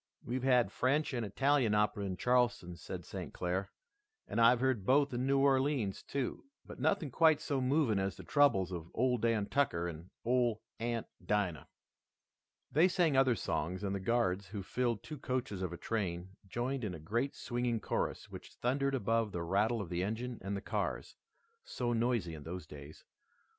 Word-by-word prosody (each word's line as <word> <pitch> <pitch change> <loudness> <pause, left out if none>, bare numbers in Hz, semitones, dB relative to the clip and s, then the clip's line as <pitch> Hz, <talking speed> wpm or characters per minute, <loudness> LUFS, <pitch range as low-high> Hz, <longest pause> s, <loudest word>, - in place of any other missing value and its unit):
"We've 125 +2 -2
had 125 -5 +3
French 140 +5 +1
and 120 -2 -1
Italian 125 +1 +2
opera 105 -1 +1
in 95 -2 -3
Charleston," 120 -6 +1
said - - -7
St. - - -6
Clair, 90 +2 -2 0.6
"and 115 - 0
I've 115 +1 +6
heard 130 -5 +1
both 140 +5 +3
in 125 +2 -1
New 140 0 +3
Orleans, 135 -6 +2
too, 135 -3 -3 0.2
but - - -10
nothing 165 -9 +1
quite 160 +2 +5
so 140 -3 -1
moving 130 -5 +2
as 95 -2 -2
the - - -9
troubles 100 - +3
of 85 -2 -6
Ole 125 0 +2
Dan 115 -2 +1
Tucker 100 -11 +1
and 85 +1 -8 0.2
Ole 120 -2 +2 0.2
Aunt 115 0 -2 0.2
Dinah." 100 -6 -1 1.0
They 160 +7 +5
sang 175 -5 +2
other 130 -2 +4
songs 90 0 -2
and 100 -1 -1
the 100 - -2
Guards, 95 -2 0
who 100 0 -6
filled 120 +1 -1
two 150 -3 -7
coaches 125 -7 -2
of 90 -2 -2
a 85 - -6
train, 90 -5 -2 0.2
joined 125 +6 -2
in 100 -4 -3
a - - -8
great 115 - -1
swinging 120 -1 -1
chorus - - -2
which - - -10
thundered 135 +2 0
above 115 -2 +1
the 85 -2 -3
rattle 105 +6 +1
of 95 - -6
the 90 0 -1
engine 115 +4 -3
and 100 +1 -3
the - - -5
cars, - - -3 0.5
so 120 -1 -2
noisy 115 -7 0
in 75 - -8
those 85 +2 -6
days. 75 -1 -12
115 Hz, 180 wpm, -34 LUFS, 95-130 Hz, 1.0 s, I've